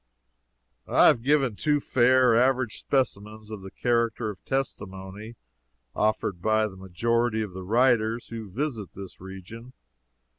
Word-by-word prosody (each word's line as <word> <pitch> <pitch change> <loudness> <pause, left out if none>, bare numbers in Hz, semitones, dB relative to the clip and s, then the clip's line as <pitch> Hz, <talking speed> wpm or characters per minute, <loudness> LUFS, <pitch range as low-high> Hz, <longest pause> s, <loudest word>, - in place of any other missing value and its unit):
I - - +5
have 115 - +5
given 135 -3 +2
two 150 +5 +1
fair, 130 -2 +4
average 125 0 +2
specimens 110 -5 -2
of 105 -2 -6
the 95 - -9
character 115 -1 0
of 100 - -11
the - - -29
testimony 105 -4 -4 0.6
offered 105 -4 0
by 110 +2 +2
the 100 -3 -6
majority 110 +5 0
of 100 -4 -7
the 95 - -7
writers 115 +2 +2
who 115 -3 -7
visit 115 - -4
this 95 -2 -10
region. 95 +6 -10
110 Hz, 140 wpm, -26 LUFS, 100-125 Hz, 0.6 s, I